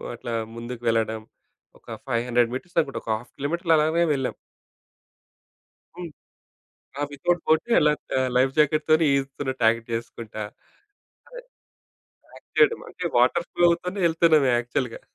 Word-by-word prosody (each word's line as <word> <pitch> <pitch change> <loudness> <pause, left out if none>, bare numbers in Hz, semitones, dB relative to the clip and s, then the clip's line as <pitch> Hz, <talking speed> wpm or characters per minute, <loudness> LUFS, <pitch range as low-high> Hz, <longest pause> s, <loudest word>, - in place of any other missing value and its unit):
అట్లా 120 0 -6 0.2
ముందుకు 120 +1 -7
వెళ్ళడం. 110 -1 0 0.6
ఒక - - -37 0.2
500 120 -1 +1
మీటర్స్ 175 +8 -7
అనుకుంట. 140 -4 -1
ఒక 110 - -3
½ 120 - -14
కిలోమీటర్లు 165 +4 0
అలానే 160 +3 +2
వెళ్ళాం. 135 -2 -2 1.6
హ్మ్. 175 -3 -7 0.9
ఆ! - - -1
విత్‌ఔట్ 170 +5 -1
బోట్ 160 0 +3
ఎలా 150 0 +4
ట్ - - -84
ఆహ్, 130 - +1
లైఫ్ 130 +1 +3
జాకెట్‍తోనే 155 +2 +3
ఈదుతున్నట్టు 135 -2 -3
యాక్ట్ 115 0 0
చేసుకుంటా. 115 -1 -5 0.9
అదే - - -10 0.9
యాక్ట్ - - -17
చేయడం. 445 +1 +4
అంటే 180 - -8
వాటర్ 170 +8 +3
ఫ్లో 175 - -1
అవుతోనే 180 +3 -2
ఎళ్తున్నం 160 -3 +4
యాక్చువల్‍గా. 120 0 -2
140 Hz, 130 wpm, -24 LUFS, 120-165 Hz, 1.6 s, ఎలా